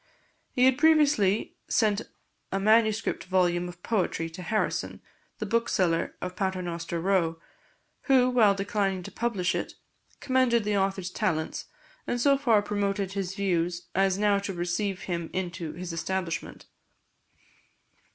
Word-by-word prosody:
He 250 -1 +3
had 260 0 +4
previously 290 -11 +3
sent 210 -1 +2 0.5
a 195 - 0
manuscript 220 +1 +2
volume 180 -1 +1
of 175 0 -13
poetry 180 -6 -1
to 180 +3 -9
Harrison, 215 +5 -1 0.4
the 215 - -3
bookseller 190 -6 +1
of 180 0 -4
Paternoster 175 -3 -3
Row, 165 -3 +1 0.7
who, 260 -3 +5
while 225 -6 +4
declining 195 -2 -1
to - - -8
publish 210 -6 -1
it, - - -4 0.4
commended 255 -4 +2
the 210 0 0
author's 195 -2 -1
talents, 175 -7 -2 0.4
and 245 - -1
so 275 +3 +4
far 235 -7 +3
promoted 200 -2 -1
his 195 -1 -3
views 175 -3 -1
as 195 0 +2
now 205 -1 +3
to 200 -1 -4
receive 180 +3 -2
him 170 -3 -3
into 175 -3 -4
his 180 -1 -6
establishment. 175 0 -3
195 Hz, 130 wpm, -27 LUFS, 180-215 Hz, 0.7 s, who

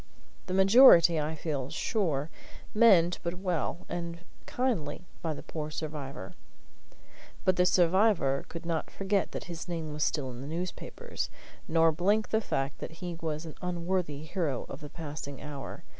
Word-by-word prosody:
The 185 - -1
majority, 190 -5 +8
I 155 +1 -2
feel 145 -4 -3
sure, 160 - -1 0.4
meant 190 -6 +5
but 170 0 -3
well 180 -2 -2
and 170 -1 -5 0.3
kindly 180 - -1 0.2
by 160 -4 -2
the - - -9
poor 155 -2 -5
survivor. 145 - -6 1.1
But 185 - +4
the 180 0 +4
survivor 180 -6 +3
could 170 0 -7
not 165 -2 -2
forget 195 0 0
that - - -5
his 170 0 -7
name 165 -3 -4
was 150 0 -1
still 135 -4 -1
in 120 0 -8
the 135 - -7
newspapers, 175 +4 -4 0.4
nor 165 0 +4
blink 200 +7 +1
the 220 - +2
fact 135 -8 -2
that - - -6
he 175 +1 -5
was 155 0 -3
an 160 - -7
unworthy 175 -4 -2
hero 155 -6 -2
of 135 - -8
the 150 - -8
passing 145 -4 -7
hour. 145 -2 -7
165 Hz, 160 wpm, -30 LUFS, 150-180 Hz, 1.1 s, majority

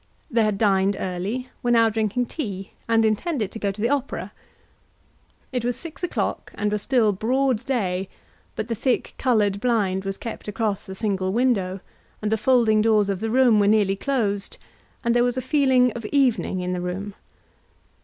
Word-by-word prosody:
They 230 -2 +3
had 210 -2 +1
dined 195 -1 +2
early, 195 +8 -3
were 245 - -1
now 230 -1 +5
drinking 220 +2 0
tea, 200 - -5 0.2
and 225 -1 +3
intended 220 - 0
to 225 - -7
go 200 -2 0
to 195 - -12
the 230 +3 +1
opera. 280 -2 -2 1.2
It 250 -3 -2
was 245 0 0
six 315 +7 -9
o'clock, 355 - -2
and 205 0 -1
was 210 -1 -1
still 235 -3 +3
broad 250 +3 +1
day, 195 -8 -1 0.5
but 220 - -3
the 235 - -1
thick 245 +3 -1
coloured 210 -6 +2
blind 205 -6 +1
was 195 0 -4
kept 230 - -7
across 210 -1 -2
the 190 - -7
single 190 -2 -1
window, 200 -5 +1 0.4
and 210 0 -2
the - - +4
folding 225 -2 +3
doors 215 -2 +3
of 195 -2 -1
the 225 +2 -2
room 245 -2 +4
were 200 - +3
nearly 205 -2 +3
closed, 205 -5 -1 0.5
and 235 - +2
there 240 0 +4
was 245 +1 0
a - - +2
feeling 260 -2 +3
of 235 - -7
evening 240 -7 +1
in 180 0 -2
the 180 - -2
room. 190 +3 -4
220 Hz, 185 wpm, -23 LUFS, 200-245 Hz, 1.2 s, now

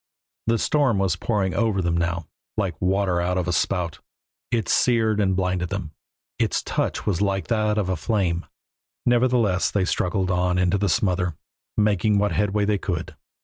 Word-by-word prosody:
The 115 0 +3
storm 140 -3 +2
was 95 -2 +1
pouring 100 -5 -1
over 110 -4 +1
them 85 -2 0
now, 85 -1 -1 0.3
like 95 -6 0
water 95 -1 +1
out 90 +1 0
of 90 -1 -1
a 90 - 0
spout; 85 -2 -1 0.5
it 115 -6 0
seared 110 -3 +2
and 95 -2 +2
blinded 90 -1 -1
them; 95 -6 -4 0.5
its - - +1
touch - - -2
was 95 -4 0
like 100 -1 0
that 110 -2 +1
of 105 -3 0
a 95 - 0
flame. 90 -2 -1 0.6
Nevertheless 120 -6 +3
they 100 -3 +1
struggled 90 +1 0
on 90 0 +1
into 90 +2 +2
the 100 0 +1
smother, 90 -2 +1 0.4
making 105 0 +2
what 105 0 +2
headway 105 0 +1
they 105 -1 +1
could. 85 -4 -4
95 Hz, 170 wpm, -24 LUFS, 90-105 Hz, 0.6 s, The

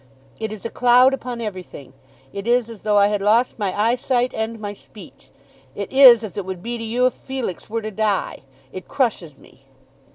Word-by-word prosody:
It 220 -1 -4
is 215 -1 -9
a 230 - -4
cloud 250 +2 +4
upon 250 -3 -5
everything. 185 - -8 0.4
It 200 +2 -6
is 240 -1 +1
as 220 - -12
though 210 -1 +1
I 200 - +6
had 205 -1 -2
lost 225 +5 +2
my 200 -1 -2
eyesight 245 +2 0
and 220 +1 -4
my 205 -1 -5
speech. 180 - -16 0.5
It 200 +4 -6
is 255 -4 +8
as 210 -3 -8
it 200 - -2
would 185 -1 -7
be 235 0 -4
to - - -6
you 240 +3 0
if 255 - +2
Felix 260 -10 -6
were 225 0 -3
to 215 - -5
die. 210 -2 -2 0.3
It 185 - -9
crushes 220 - -2
me." 135 - -21
220 Hz, 200 wpm, -21 LUFS, 200-245 Hz, 0.5 s, is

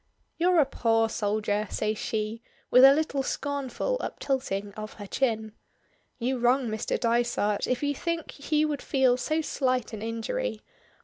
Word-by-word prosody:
"You're 355 0 +4
a 295 - +6
poor 225 -3 +1
soldier!" 210 -1 -1
says 215 0 -1
she, 220 +1 -3 0.3
with 250 - +7
a 270 - +11
little 285 -1 +1
scornful 285 - -2
uptilting 205 - -3
of 215 +1 -7
her 205 - -9
chin. 220 -1 -1 0.7
"You 255 +2 -1
wrong 245 +1 +2
Mr. 215 0 -2
Dysart 235 -3 +1
if 255 +2 -1
you 285 0 +1
think 335 +2 -3
he 300 +1 0
would 295 -2 -2
feel 260 -3 +3
so 310 +5 -1
slight 255 -6 -1
an 215 - -6
injury. 230 - -3
250 Hz, 150 wpm, -27 LUFS, 220-285 Hz, 0.7 s, a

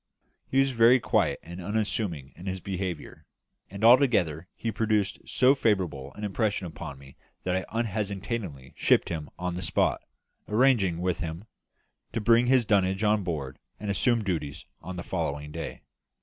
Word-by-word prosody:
He 135 - 0
was 135 0 +3
very 120 +1 +6
quiet - - +1
and 85 +3 -8
unassuming 100 - -2
in 90 +4 -10
his 95 0 -2
behaviour; 90 -3 -5 0.4
and 100 +2 -7
altogether 105 - +4
he 115 - -3
produced 105 -1 0
so 130 +1 +5
favourable 90 - 0
an 105 - -8
impression 105 -1 -1
upon 80 -4 -7
me 70 0 -15 0.3
that 90 0 0
I 95 - -1
unhesitatingly 100 - -3
shipped - - +3
him 80 -3 -4
on 90 0 -3
the 90 - -4
spot, 80 - +1 0.5
arranging 105 -7 +3
with 90 -1 0
him 80 +3 -5 0.7
to 115 - 0
bring 115 +2 +4
his 130 -2 +4
dunnage 95 -1 +2
on 105 -1 +3
board 75 -7 -4 0.2
and 105 0 -2
assume 115 +3 +2
duty 80 -7 -2 0.3
on 90 +3 -7
the 90 - -5
following 75 -5 -3
day. 80 +1 -6
95 Hz, 160 wpm, -27 LUFS, 85-110 Hz, 0.7 s, very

